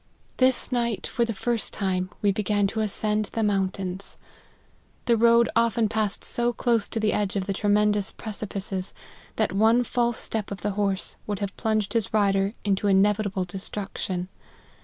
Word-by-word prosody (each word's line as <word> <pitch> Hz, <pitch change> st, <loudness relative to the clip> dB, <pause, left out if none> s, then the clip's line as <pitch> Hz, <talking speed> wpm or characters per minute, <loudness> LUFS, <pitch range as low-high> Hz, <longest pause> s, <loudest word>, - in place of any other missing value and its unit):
This 255 Hz, 0 st, +2 dB
night, 235 Hz, -3 st, -1 dB
for 235 Hz, -, 0 dB
the 230 Hz, -, -3 dB
first 235 Hz, +1 st, 0 dB
time, 185 Hz, -2 st, -1 dB
we 205 Hz, -, +4 dB
began 205 Hz, 0 st, +1 dB
to 210 Hz, +3 st, -2 dB
ascend 215 Hz, 0 st, 0 dB
the 225 Hz, -, 0 dB
mountains. 195 Hz, -2 st, -2 dB, 0.9 s
The 235 Hz, -, +4 dB
road 235 Hz, +1 st, +5 dB
often 230 Hz, -1 st, +3 dB
passed 215 Hz, -2 st, -1 dB
so 240 Hz, 0 st, 0 dB
close 230 Hz, -3 st, +1 dB
to 225 Hz, -, -3 dB
the 215 Hz, -1 st, +1 dB
edge 205 Hz, -1 st, -1 dB
of 195 Hz, -2 st, -1 dB
the 195 Hz, -, -1 dB
tremendous 205 Hz, 0 st, +2 dB
pre 220 Hz, -, -7 dB
cipices, 195 Hz, -2 st, -4 dB, 0.4 s
that -, -, 0 dB
one 225 Hz, +4 st, +4 dB
false 240 Hz, -1 st, 0 dB
step 220 Hz, -2 st, -2 dB
of 200 Hz, -, -6 dB
the 210 Hz, -, -1 dB
horse 200 Hz, -1 st, -1 dB
would 205 Hz, -1 st, -2 dB
have 200 Hz, 0 st, -4 dB
plunged 215 Hz, -3 st, 0 dB
his 225 Hz, -4 st, 0 dB
rider 200 Hz, 0 st, +2 dB
into 200 Hz, 0 st, +1 dB
inevitable 200 Hz, -1 st, +2 dB
destruction. 190 Hz, -1 st, -4 dB
210 Hz, 165 wpm, -25 LUFS, 195-225 Hz, 0.9 s, road